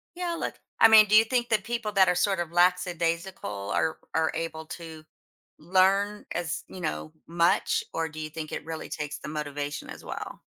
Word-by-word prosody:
yeah," 350 -1 -2
like - - -4 0.2
I 225 - +9
mean, 220 -1 +8
do 210 - +4
you 220 - +9
think 240 0 0
the 220 - +3
people 225 +1 -3
that 190 -2 +5
are 180 - +2
sort 190 +1 +1
of 175 -2 -2
lackadaisical 175 - 0
are 160 - 0 0.2
are 160 0 +2
able 160 -1 -4
to 160 -2 -10 0.5
learn 195 +5 +2
as, 170 -1 -3
you 185 - -9
know, 155 -1 -3
much? 170 +1 +2
Or 165 0 -1
do 155 +1 -9
you 155 0 -4
think 160 -1 -6
it - - -5
really 160 -1 -6
takes 150 -1 -5
the - - -8
motivation 145 -1 -4
as - - -10
well? - - -7
170 Hz, 195 wpm, -27 LUFS, 160-200 Hz, 0.5 s, I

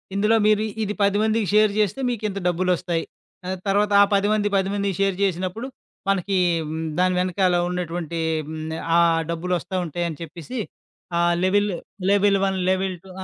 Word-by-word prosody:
ఇందులో 210 +3 +3
మీరు 215 0 +3 0.2
ఇది 210 0 -2
10 200 0 +3
మందికి 220 -1 +1
షేర్ 215 0 +5
చేస్తే 210 +3 +1
మీకింత 215 -4 -3
డబ్బులొస్తాయి, 175 -1 0 0.6
తర్వాత 205 +1 +2
ఆ - - +9
10 200 0 +3 0.3
మంది 190 0 +1
మందికి 200 -2 -1
షేర్ 195 -1 +2
చేసినప్పుడు 190 +5 -2 0.4
మనకి 195 0 0 0.6
దాని 185 0 +3
వెనకాల 185 0 +1
ఉన్నటువంటి 170 -2 -3 0.6
ఆహ్, - - -7
ఆ - - +6 0.3
డబ్బులొస్తా 175 +1 -2
ఉంటాయని 170 -1 -3
చెప్పేసి 170 - -7 0.6
ఆ - - +2 0.2
లెవెల్, 205 +2 +2 0.4
లెవెల్ 200 0 +4
1 190 -1 0
లెవెల్ 190 0 -1
2 190 - -15
190 Hz, 140 wpm, -23 LUFS, 180-205 Hz, 0.6 s, ఆ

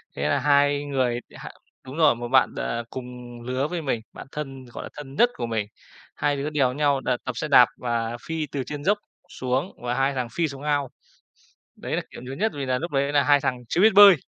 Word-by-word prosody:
Thế 70 +2 -1
là - - +2
hai 145 0 +3
người 130 -4 0 0.2
h - - -9 0.4
đúng 130 +4 -8
rồi, 155 -6 +5
một 120 +1 -5
bạn, 130 +2 +4
ờ, 115 0 -2
cùng 125 -1 -8
lứa 130 +4 -1
với 175 -1 -3
mình, 125 -6 -1
bạn - - -10
thân, 135 -3 -6
gọi 120 - -8
là, - - -7
thân 140 -2 -8
nhất 240 +7 +5
của 120 - -3
mình. 110 -3 -2 0.5
Hai 145 -1 +1
đứa 145 +2 -2
đèo 135 -4 +1
nhau 140 -1 +2
đ - - -3 0.2
tập 130 - -1
xe - - -2
đạp 125 -4 +8
và 120 -1 -2
phi 160 -2 -2
từ 140 -2 -2
trên 145 -1 -6
dốc 205 +5 +3 0.3
xuống 130 +7 -2
và 120 0 -1
hai 135 +2 +1
thằng 125 -2 -2
phi 170 -1 +1
xuống 140 -2 -8
ao. 145 -3 0 0.9
Đấy - - -4
là - - 0
kiểu - - -10
nhớ 130 +1 -7
nhất 220 +6 0
vì 140 -2 -3
là 125 -1 0
núc 170 +2 -4
đấy 140 0 +1
là 145 -1 +4
hai 145 +1 +5
thằng 125 - 0
chưa 175 - +2
biết 220 -1 +6
bơi, 200 -2 +10
135 Hz, 240 wpm, -25 LUFS, 125-150 Hz, 0.9 s, bơi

